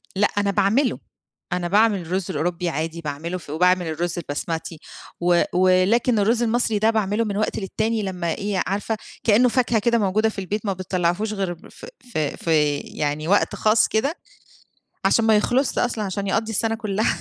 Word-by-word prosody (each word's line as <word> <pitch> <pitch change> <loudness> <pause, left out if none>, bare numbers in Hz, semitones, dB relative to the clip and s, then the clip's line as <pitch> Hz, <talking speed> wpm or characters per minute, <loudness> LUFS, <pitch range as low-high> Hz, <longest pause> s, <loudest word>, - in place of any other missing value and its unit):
لأ، 205 +2 +3
أنا 200 -1 +2
باعمله، 205 +7 +2 0.5
أنا 175 -1 -1
باعمل 210 +1 +3
الرز 180 +2 -2
الأوروبي 170 +3 -1
عادي، 165 +2 -3
باعمله 155 +4 -4
في 155 - -11
وباعمل 180 +2 +2
الرز 165 +2 -2
البسمتي، 160 +1 -4 0.4
و 175 0 +4
ولكن 185 +6 +3
الرز 230 +4 +2
المصري 230 -2 +1
ده 220 +2 +3
باعمله 215 0 +1
من 200 -1 -3
وقت 215 - -1
للتاني 220 +2 -1
لما 180 -3 -2
إيه، 200 -2 -2
عارفة، 205 +3 -2 0.3
كأنه 235 +2 +4
فاكهة 240 -2 +1
كده 235 +2 +2
موجودة 215 +2 +2
في 210 - -7
البيت 205 +3 -4
ما 200 - 0
بتطلّعهوش 185 +3 -1
غير 190 -4 -2
ف - - -12 0.3
ف - - -2
في، 150 -1 +1
يعني 150 +1 -3
وقت 200 +2 +2
خاص 215 +1 +3
كده، 270 +9 0 0.9
عشان 230 - +3
ما 220 -1 +5
يخلَصش 245 +5 +1
أصلًا 235 -3 -1
عشان 195 +1 -3
يقضّي 225 +2 0
السنة 225 +1 0
كلّها 215 -1 -1
200 Hz, 170 wpm, -22 LUFS, 175-220 Hz, 0.9 s, ما